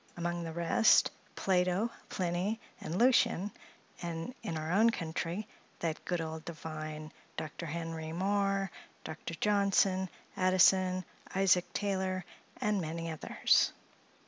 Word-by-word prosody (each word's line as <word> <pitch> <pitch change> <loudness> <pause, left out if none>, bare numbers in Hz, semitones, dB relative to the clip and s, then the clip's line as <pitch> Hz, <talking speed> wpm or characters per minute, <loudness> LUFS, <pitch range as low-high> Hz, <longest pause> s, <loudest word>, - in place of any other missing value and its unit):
Among 175 0 -2
the 165 - -4
rest, 170 +6 +4 0.2
Plato, 185 +4 +2 0.2
Pliny, 185 +5 -1 0.2
and 165 - -4
Lucien; 230 -5 +4 0.5
and 170 +5 -4
in 185 -8 -3
our 155 +1 -3
own 220 +5 +6
country, 170 +1 -3 0.3
that 160 -2 -3
good 175 -1 0
old 160 -1 -4
divine, 155 -2 -6 0.3
Dr. 155 +2 -5
Henry 165 0 -4
Moore, 195 +1 +1 0.3
Dr. 160 +1 -6
Johnson, 195 -1 +2 0.3
Addison, 185 0 +4 0.3
Isaac 185 -2 +3
Taylor, 190 -2 -1 0.3
and 210 -2 +1
many 165 +1 -3
others. 155 - +3
180 Hz, 115 wpm, -32 LUFS, 165-195 Hz, 0.5 s, own